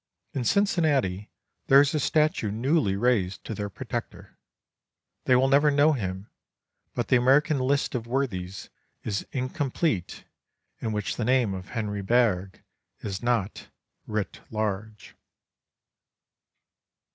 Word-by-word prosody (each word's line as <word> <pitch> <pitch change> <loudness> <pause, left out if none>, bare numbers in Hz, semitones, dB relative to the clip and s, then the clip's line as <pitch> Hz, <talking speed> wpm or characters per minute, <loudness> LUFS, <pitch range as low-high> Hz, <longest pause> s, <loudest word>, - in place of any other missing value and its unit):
In 130 -3 -2
Cincinnati 145 - +1 0.4
there 135 - +8
is 140 0 +3
a 155 - +1
statue 150 -7 +1
newly 120 0 +1
raised 100 -4 +1
to - - -5
their 105 -1 -4
protector. 95 - -6 0.9
They 130 - +5
will 130 +2 +4
never 140 +2 +4
know 145 +2 +4
him, 95 -5 -4 0.7
but - - -2
the 130 - +6
American 140 +4 +3
list 140 +2 0
of 120 -3 -3
worthies 100 -8 -3 0.3
is 100 -3 -3
incomplete 130 - -2 0.6
in 110 - -3
which 105 -2 -2
the 120 - -1
name 125 -4 +2
of 95 0 -7
Henry 105 -2 -2
Bergh 100 -4 +1 0.4
is 100 -2 -4
not 115 -5 -1 0.4
"writ 105 -4 -3
large." 110 -1 -4
120 Hz, 120 wpm, -26 LUFS, 100-135 Hz, 0.9 s, there